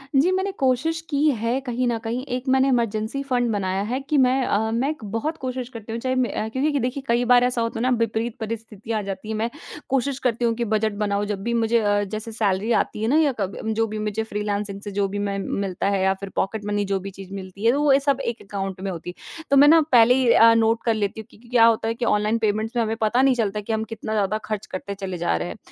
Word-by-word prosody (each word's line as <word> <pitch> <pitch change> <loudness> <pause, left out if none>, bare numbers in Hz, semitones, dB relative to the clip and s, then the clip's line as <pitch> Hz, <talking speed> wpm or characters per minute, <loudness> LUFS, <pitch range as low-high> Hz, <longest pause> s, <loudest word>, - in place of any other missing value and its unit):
जी, 295 +7 +4
मैंने 380 +1 0
कोशिश 270 +5 +1
की 285 -3 0 0.2
है 235 +3 0
कहीं 250 0 -1
न 235 -1 0
कहीं 235 +3 -3
एक 255 +2 -10
मैंने 265 +1 +4
इमरजेंसी 230 +1 0
फंड 250 -3 0
बनाया 190 -2 -1
है 255 - 0
कि 300 - +2
मैं 255 +1 +2
अ, 220 +1 0
मैं 240 +5 0
एक 305 -6 -5
बहुत 300 +9 -2
कोशिश 255 -1 -3
करती 225 -3 -9
हूँ, 230 - -3
चाहे 255 +1 -1 0.2
अ, 215 - -2
क्योंकि 280 +5 0
देखिए 255 +2 -2
कई 235 +1 +2
बार 245 0 +5
ऐसा 250 -1 +1
होता 230 0 -2
है - - -2
ना 255 - +2
विपरीत 230 0 -1
परिस्थितियाँ 220 -1 -5
आ - - -3
जाती 195 +2 -6
है, 220 - -2
मैं 225 +2 -1 0.4
कोशिश 270 0 0
करती 240 -2 0
हूँ 230 - +2
कि 235 +1 -2
बजट 215 0 +1
बनाऊँ 205 0 0
जब 205 -2 -4
भी 235 - -1
मुझे 230 0 +2
अ, 205 -1 +1
जैसे 215 +3 -5
सैलरी 210 0 0
आती 210 - -3
है 220 - 0
ना 280 +6 +3
या 300 -3 +3
कभी 195 -1 -2
अम, 220 - -2
जो 225 +1 +1
भी 215 0 -5
मुझे 215 +1 -2
फ्रीलांसिंग 205 -2 -3
से 205 - -6
जो 200 0 0
भी 200 +1 -4
मैं 200 -1 -2
मिलता 195 0 -2
है 195 -1 +1
या 190 0 +3
फिर 195 0 -8
पॉकेट 205 +2 -2
मनी 205 0 0
जो 195 0 -1
भी 195 +1 -7
चीज़ 195 0 -11
मिलती 195 +2 -7
है 230 - +6
तो 280 +3 0
वो 275 -2 +5
सब 275 -1 +2
एक 235 0 -3
अकाउंट 195 -2 -5
में 195 0 -3
होती 180 0 -6
है। 330 - -11
तो 280 - +6
मैं 285 +2 +8
ना 325 +2 +7
पहले 240 -1 +7
ही 260 -2 +2
अ, 230 0 +7
नोट 225 0 +2
कर 230 - +3
लेती 215 0 -2
हूँ 220 - -17
क्योंकि 235 +3 -19
क्या 235 -2 +5
होता 225 -1 +3
है 225 - 0
कि 235 - -2
ऑनलाइन 210 +1 +2
पेमेंट्स 220 +1 -1
में 235 - +2
हमें 220 0 -1
पता 220 +4 +3
नहीं 265 -1 +4
चलता 210 -3 -1
कि 215 +2 -3
हम 220 0 0
कितना 220 0 -5
ज़्यादा 210 0 +1
खर्च 215 -1 -4
करते 200 +2 -5
चले 190 -2 -5
जा 170 - 0
रहे 80 - -3
हैं। 85 - -7
225 Hz, 270 wpm, -23 LUFS, 205-245 Hz, 0.4 s, मैं